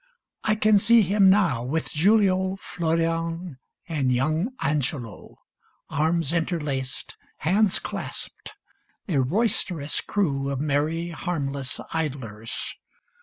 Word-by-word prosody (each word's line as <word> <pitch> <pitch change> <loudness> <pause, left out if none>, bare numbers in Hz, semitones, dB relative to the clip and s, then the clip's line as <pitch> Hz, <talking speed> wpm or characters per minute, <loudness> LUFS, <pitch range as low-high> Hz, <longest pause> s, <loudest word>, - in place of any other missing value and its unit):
I 215 - +2
can 215 -1 +4
see 230 +2 +6
him 195 +1 +4
now, 185 - +3
With 155 +6 -2
Giulio, 190 +1 +3
Florian, 165 -3 -2 0.3
and 145 -6 0
young 155 - +1
Angelo, 135 -6 -2 0.5
Arms 160 +1 +1
interlaced, 150 -6 -2 0.2
hands 195 +5 +3
clasped, - - -6 0.5
a 160 -8 +1
roisterous 175 - 0
crew 140 -9 0
Of 140 -2 -2
merry, 155 +4 0
harmless 140 -7 -3
idlers. 130 -9 -3
165 Hz, 100 wpm, -25 LUFS, 140-185 Hz, 0.5 s, see